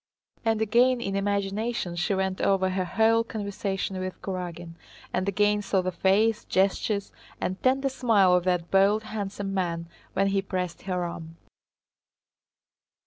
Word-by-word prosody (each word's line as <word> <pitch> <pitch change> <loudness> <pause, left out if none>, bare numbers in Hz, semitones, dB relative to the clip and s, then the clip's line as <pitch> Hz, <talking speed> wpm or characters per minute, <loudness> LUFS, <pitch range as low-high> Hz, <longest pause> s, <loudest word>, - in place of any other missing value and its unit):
And 225 -1 +1
again 245 +4 +3
in 195 -4 -3
imagination 200 0 -1
she 175 +4 0
went 190 0 -1
over 190 -1 +2
her 185 0 -1
whole 225 +4 +3
conversation 200 -3 -3
with 185 0 -5
Kurágin, 175 -3 -5 0.4
and 185 +2 0
again 205 +1 +2
saw 195 -2 0
the 185 - -1
face, 210 +5 +2
gestures, 200 +2 0 0.3
and 185 +1 -3
tender 270 +2 +2
smile 225 -8 +3
of 180 -1 +3
that 180 -2 0
bold 200 +3 +4
handsome 205 -2 -4
man 170 -3 -2 0.3
when 195 +1 +2
he 195 0 +1
pressed 185 -3 -4
her 180 -1 0
arm. 165 -1 -7
195 Hz, 140 wpm, -27 LUFS, 185-215 Hz, 0.4 s, bold